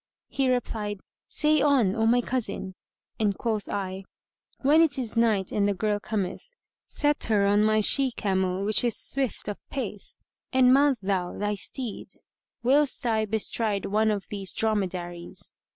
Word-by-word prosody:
He 270 -1 0
replied, 210 -5 -2 0.3
"Say 305 -1 +3
on, 260 -9 +3
O 225 -1 +1
my 245 +2 +4
cousin"; 240 -6 -3 0.5
and 205 -3 +1
quoth 220 -3 -2
I, 190 -1 -4 0.6
"When 295 +4 +5
it 305 -4 +3
is 240 -4 -3
night 220 -5 +2
and 205 -1 +1
the 200 - 0
girl 210 +2 0
cometh, 205 -3 -3 0.5
set 295 0 +1
her 210 -3 +2
on 205 +1 +3
my 215 0 +3
she 270 +5 +3
camel 190 -4 -1
which 215 +2 +2
is 240 -2 0
swift 265 -6 -2
of 205 - -4
pace, 215 -7 -5 0.3
and 255 -1 +5
mount 280 -1 +4
thou 190 -2 -1
thy 205 +1 -1
steed, 225 +3 -5 0.5
whilst 275 +1 +3
I 220 -2 +1
bestride 215 -1 0
one 215 +2 +2
of 205 -2 -1
these 195 -2 -1
dromedaries. 180 -5 -2
215 Hz, 155 wpm, -26 LUFS, 200-250 Hz, 0.6 s, When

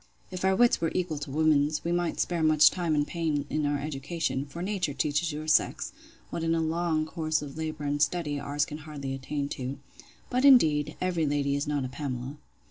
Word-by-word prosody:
If 185 -1 -5
our 190 0 +3
wits 240 -1 +4
were 165 - +1
equal 175 -5 -1
to 145 - -6
women's, 150 0 +2
we 170 - -1
might 175 -1 -1
spare 175 -2 0
much 155 -1 +6
time 170 -4 -1
and 145 0 +2
pains 155 -3 -1
in 150 -1 0
our 145 0 +1
education: 140 0 -3
for 170 +5 -6
nature 185 -7 -1
teaches 150 +3 0
your 155 +1 -6
sex, 155 - +2 0.4
what, - - -3
in 165 0 +1
a - - +1
long 160 -1 0
course 155 -1 -1
of 140 -2 -8
labour 155 -1 -4
and 145 0 -1
study, 150 -2 0
ours 145 +1 -1
can 150 - -7
hardly 145 -3 -6
attain 140 +2 -3
to.—But, 140 - -6
indeed, 155 - +5
every 175 -4 0
lady 140 -1 0
is 140 +1 -2
not 145 -3 -1
a - - -2
Pamela. 130 +1 -5
155 Hz, 205 wpm, -28 LUFS, 145-165 Hz, 0.4 s, much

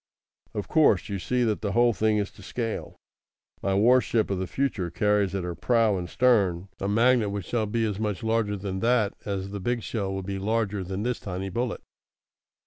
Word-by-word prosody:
"Of 105 - -3
course, 145 - +3
you 100 -1 -2
see 125 +6 0
that 110 -3 0
the 100 -2 -2
whole 120 +1 +4
thing 110 0 +2
is 100 -2 -1
to - - -16
scale. 115 +3 -4 0.7
My 95 0 0
warship 115 0 +3
of 95 - -1
the 95 - -2
future 110 -7 -1
carries 105 -1 +1
at 95 - -2
her 90 0 -3
prow 115 +2 +2
and 90 -2 -4
stern 100 -8 +2
a 95 - -2
magnet 115 +1 +3
which 100 -3 -4
shall 110 +1 -1
be 115 +2 0
as 105 -2 -2
much 105 -3 -2
larger 110 -2 0
than 95 -1 -4
that 115 -2 +2
as 100 -1 -3
the 100 - -4
big 120 +3 -1
shell 100 -4 -2
will 95 0 -3
be 100 +1 -4
larger 105 -1 -1
than 95 +3 -4
this 125 0 -1
tiny 95 0 -4
bullet. 120 +5 -3
105 Hz, 205 wpm, -26 LUFS, 95-115 Hz, 0.7 s, whole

